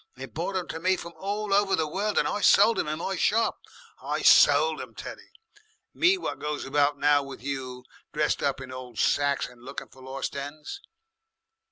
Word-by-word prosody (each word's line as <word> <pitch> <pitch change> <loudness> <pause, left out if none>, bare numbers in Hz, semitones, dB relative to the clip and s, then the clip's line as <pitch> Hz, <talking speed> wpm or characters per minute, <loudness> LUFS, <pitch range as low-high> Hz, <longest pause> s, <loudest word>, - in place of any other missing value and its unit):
They 130 +1 -7
brought 165 - -4
'em 180 - -3
to 160 - -5
me 185 +3 +2
from 170 0 -8
all 205 +1 -3
over 200 -1 +3
the 160 - -1
world, 205 +7 -2
and - - +3
I 205 - -2
sold 210 +3 +5
'em - - -1
in 155 +1 -2
my 190 +3 -3
shop. 220 +5 +1 0.4
I - - -3
sold 475 - +6
'em, - - -10
Teddy! - - -9 0.6
me 375 +2 +3
what - - -5
goes 150 0 -4
about 145 +1 +2
now 145 0 +4
with 135 -2 -10
you, 130 -2 -5 0.3
dressed 150 0 0
up 140 -1 0
in 130 -1 -9
old 125 -3 -9
sacks 140 -1 +1
and 125 -1 -17
looking 135 +3 -8
for 130 - -17
lost 135 +2 -5
'ens. 145 - -7
150 Hz, 195 wpm, -27 LUFS, 135-195 Hz, 0.6 s, sold